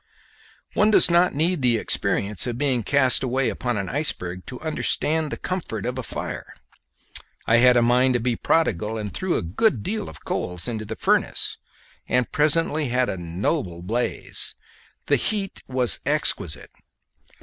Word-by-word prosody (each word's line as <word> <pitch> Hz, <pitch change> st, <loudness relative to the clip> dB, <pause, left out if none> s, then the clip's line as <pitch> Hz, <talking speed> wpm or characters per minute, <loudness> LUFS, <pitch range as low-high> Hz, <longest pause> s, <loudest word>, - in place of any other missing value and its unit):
One 210 Hz, -, +4 dB
does 210 Hz, -, +6 dB
not 175 Hz, -2 st, +4 dB
need 165 Hz, +2 st, +1 dB
the 120 Hz, -2 st, +4 dB
experience 105 Hz, 0 st, -1 dB
of 120 Hz, -1 st, -3 dB
being 130 Hz, -3 st, +1 dB
cast 130 Hz, +3 st, +3 dB
away 130 Hz, +1 st, 0 dB
upon 125 Hz, -3 st, -2 dB
an 100 Hz, -2 st, -2 dB
iceberg 90 Hz, -, -3 dB
to 125 Hz, -, -7 dB
understand 155 Hz, 0 st, 0 dB
the -, -, -3 dB
comfort 160 Hz, -, -4 dB
of 125 Hz, +1 st, -3 dB
a -, -, -1 dB
fire. -, -, -6 dB, 0.9 s
I 115 Hz, -, +4 dB
had 125 Hz, +1 st, +6 dB
a 120 Hz, -, +4 dB
mind 125 Hz, +2 st, +3 dB
to -, -, +2 dB
be 120 Hz, 0 st, 0 dB
prodigal, 110 Hz, -, 0 dB
and 105 Hz, -4 st, -5 dB
threw 185 Hz, -, -1 dB
a -, -, -2 dB
good 110 Hz, -, +1 dB
deal 215 Hz, +2 st, -3 dB
of 80 Hz, -, -14 dB
coals 90 Hz, +3 st, -2 dB
into 110 Hz, -3 st, -3 dB
the 110 Hz, +2 st, -5 dB
furnace, -, -, 0 dB, 0.5 s
and 125 Hz, -1 st, +1 dB
presently 155 Hz, 0 st, +2 dB
had 125 Hz, +1 st, +1 dB
a 95 Hz, -, -3 dB
noble 85 Hz, -, -2 dB
blaze. 115 Hz, +6 st, -2 dB, 0.5 s
The -, -, +3 dB
heat 200 Hz, -3 st, -2 dB
was 125 Hz, -9 st, +2 dB
exquisite. 75 Hz, -, -1 dB
125 Hz, 160 wpm, -23 LUFS, 110-150 Hz, 0.9 s, does